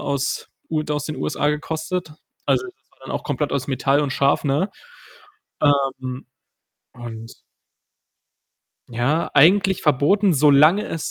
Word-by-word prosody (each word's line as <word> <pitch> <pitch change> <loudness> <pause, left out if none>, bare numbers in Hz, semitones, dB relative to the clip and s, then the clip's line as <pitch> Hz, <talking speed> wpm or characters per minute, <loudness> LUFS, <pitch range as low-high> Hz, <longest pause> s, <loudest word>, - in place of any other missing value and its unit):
aus 140 -1 -2 0.2
u 155 -1 0
aus 150 -2 -1
den 155 - -5
USA 150 0 -1
gekostet. 160 +2 -4 0.3
Also, - - +2
das 370 - -17
war - - -30
dann - - -9
auch - - -3
komplett - - -2
aus 135 -1 -2
Metall 135 +1 +1
und 145 -2 -1
scharf, 140 0 +2
ne? 150 +8 0 0.9
Ähm, 135 -3 0 0.7
und 115 -2 -10 1.5
ja, 125 +8 -1
eigentlich 190 +6 +4
verboten, 175 +8 +3
solange 150 +8 +5
es 165 - -4
145 Hz, 130 wpm, -21 LUFS, 135-160 Hz, 1.5 s, solange